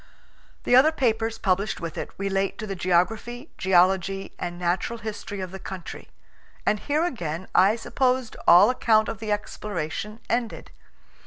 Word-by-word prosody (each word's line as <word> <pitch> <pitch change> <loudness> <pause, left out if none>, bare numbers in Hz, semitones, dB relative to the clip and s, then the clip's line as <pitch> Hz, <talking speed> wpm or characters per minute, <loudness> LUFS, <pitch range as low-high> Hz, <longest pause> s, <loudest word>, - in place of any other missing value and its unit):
The 245 - +4
other 280 +5 +7
papers 225 -6 0
published 195 +1 0
with 165 -2 -5
it - - -4
relate 195 0 -1
to 215 - -5
the 200 - -4
geography, 220 - 0
geology, 190 +1 +2
and 175 0 -4
natural 180 +7 -1
history 210 -2 -6
of 185 -1 -5
the 190 - -7
country. 190 -3 -8 0.6
And 210 - +2
here 300 +7 0
again 180 - -4
I 200 +4 +5
supposed 255 0 0
all 190 +7 +8
account 220 -3 +2
of 220 - -5
the 220 -1 -4
exploration 210 0 -4
ended. 235 -1 -2
205 Hz, 150 wpm, -25 LUFS, 185-230 Hz, 0.6 s, all